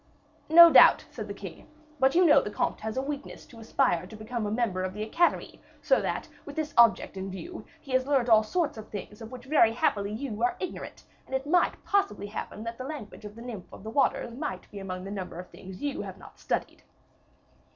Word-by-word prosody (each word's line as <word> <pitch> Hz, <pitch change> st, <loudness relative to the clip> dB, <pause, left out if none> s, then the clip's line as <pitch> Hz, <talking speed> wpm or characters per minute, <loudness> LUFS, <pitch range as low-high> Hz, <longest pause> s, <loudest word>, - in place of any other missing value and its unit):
"No 335 Hz, +1 st, +10 dB
doubt," -, -, +8 dB
said -, -, -7 dB
the -, -, -5 dB
king; -, -, -10 dB, 0.3 s
"but 265 Hz, +2 st, +3 dB
you 360 Hz, +1 st, +5 dB
know 300 Hz, -2 st, +6 dB
the -, -, -5 dB
comte -, -, -2 dB
has 220 Hz, 0 st, -5 dB
the 260 Hz, -, -1 dB
weakness 285 Hz, 0 st, -6 dB
to 230 Hz, -, -15 dB
aspire 225 Hz, -6 st, 0 dB
to 215 Hz, -, -11 dB
become 215 Hz, +1 st, -4 dB
a -, -, -3 dB
member 215 Hz, -5 st, 0 dB
of 185 Hz, +1 st, -4 dB
the 210 Hz, -, -3 dB
Academy, 335 Hz, +11 st, 0 dB, 0.2 s
so -, -, +2 dB
that, -, -, -3 dB, 0.2 s
with -, -, -10 dB
this 310 Hz, -1 st, -3 dB
object 230 Hz, -4 st, +4 dB
in 190 Hz, +1 st, -4 dB
view, 335 Hz, -, -8 dB
he 275 Hz, -, -12 dB
has 260 Hz, +1 st, +1 dB
learnt 270 Hz, -4 st, +2 dB
all 220 Hz, -2 st, +6 dB
sorts 295 Hz, +2 st, -1 dB
of 215 Hz, -, -10 dB
things 210 Hz, +1 st, -8 dB
of 225 Hz, -, -9 dB
which 250 Hz, -1 st, -10 dB
very 265 Hz, -6 st, +4 dB
happily 205 Hz, -3 st, 0 dB
you 220 Hz, -1 st, -5 dB
are 245 Hz, +1 st, +1 dB
ignorant; 370 Hz, -, -7 dB, 0.2 s
and 265 Hz, -, -4 dB
it 265 Hz, +1 st, -2 dB
might 350 Hz, +4 st, +1 dB
possibly 400 Hz, -, 0 dB
happen 210 Hz, +1 st, -6 dB
that 230 Hz, +1 st, -6 dB
the -, -, -4 dB
language 265 Hz, -7 st, -8 dB
of 210 Hz, 0 st, -9 dB
the 230 Hz, -, -10 dB
Nymph 230 Hz, -7 st, -8 dB
of -, -, -12 dB
the 220 Hz, -, -6 dB
Waters 250 Hz, -2 st, +1 dB
might 235 Hz, -, -5 dB
be 205 Hz, -, -8 dB
among 185 Hz, -1 st, -6 dB
the 195 Hz, -, -7 dB
number 185 Hz, -4 st, -6 dB
of 180 Hz, -, -9 dB
things 190 Hz, +3 st, -11 dB
you 285 Hz, -1 st, -2 dB
have -, -, -8 dB
not -, -, -15 dB
studied." -, -, -3 dB
230 Hz, 230 wpm, -28 LUFS, 210-280 Hz, 0.3 s, No